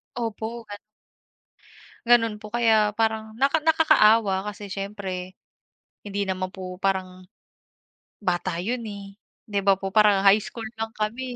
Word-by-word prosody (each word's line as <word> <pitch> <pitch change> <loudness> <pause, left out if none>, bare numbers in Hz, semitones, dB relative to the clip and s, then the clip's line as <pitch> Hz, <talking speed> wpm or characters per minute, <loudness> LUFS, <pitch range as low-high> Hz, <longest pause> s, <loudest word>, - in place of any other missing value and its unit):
Opo 230 0 -4
gan 205 - -6 1.3
Gano'n 230 -2 +4
po, 215 +1 -12
kaya 220 -3 +3
parang 220 -1 0
naka 280 +4 +3
nakakaawa 220 -11 +4
kasi 205 -1 -7
siyempre, 195 -2 -5 0.7
hindi 200 0 -4
naman 185 0 -3
po 185 -1 -7
parang, 185 -1 -2 1.0
bata 175 -1 -1
'yun, 235 +5 -2
eh. 200 -1 -9 0.3
'Di 200 -1 -1
ba 195 -1 +5
po 195 0 -5
parang 205 -2 +4
high 200 +2 +6
school 225 0 -7
lang 225 0 -4
kami, 215 +4 -2
210 Hz, 130 wpm, -24 LUFS, 195-225 Hz, 1.3 s, high